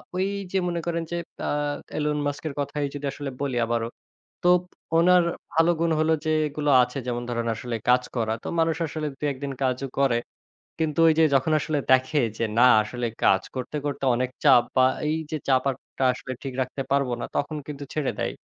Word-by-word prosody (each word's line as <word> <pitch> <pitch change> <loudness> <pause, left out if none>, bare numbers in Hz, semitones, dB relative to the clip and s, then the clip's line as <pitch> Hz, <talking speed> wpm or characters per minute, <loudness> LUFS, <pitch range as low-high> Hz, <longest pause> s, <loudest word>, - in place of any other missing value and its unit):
ওই 190 +1 +1 0.2
যে 190 - +1
মনে 170 -1 -2
করেন 170 -1 -1
যে 170 - -1 0.3
আ - - 0 0.5
Elon 150 -1 0
Musk 145 +1 -3
এর 145 - -4
কথাই 145 +1 -2
যদি 145 0 -5
আসলে 145 -1 -5
বলি 135 -4 -1
আবারো। 115 0 -1 0.6
তো 175 - +3 0.5
ওনার 180 +1 +6 0.3
ভালো 165 +2 +4
গুণ 170 0 +2
হল 155 +1 +2
যে 155 - +1 0.2
এগুলো 145 0 -1
আছে 125 +3 -3
যেমন 120 -1 -2
ধরেন 115 -1 -2
আসলে 115 +1 -4
কাজ 125 0 +5
করা। 110 -2 0
তো - - -4
মানুষ 165 -1 +2
আসলে 155 0 -4
দুই 150 - -3
একদিন 135 +1 -5
কাজও 130 +1 0
করে। 130 -4 +3 0.6
কিন্তু 155 0 0
ওই 160 - +6
যে 160 - +6
যখন 135 +4 +2
আসলে 150 0 -1
দেখে 130 +3 +4 0.2
যে 115 - 0
না 125 - +8 0.2
আসলে 120 +2 -3 0.2
কাজ 95 - +5
করতে 130 +4 -4
করতে 145 -1 -3
অনেক 125 +1 -1
চাপ 130 -4 +7
বা 130 - +6 0.2
এই 155 +1 +1
যে 155 - -1
চাপ 130 -1 +4
আর 135 - -1 0.2
টা - - 0
আসলে 130 +1 -8
ঠিক 135 - -5
রাখতে 130 +2 -3
পারবো 140 -3 +2
না, - - -2
তখন 145 +2 -1
কিন্তু 145 -1 -6
ছেড়ে 150 -3 0
দেয়। - - -1
140 Hz, 205 wpm, -25 LUFS, 125-155 Hz, 0.6 s, না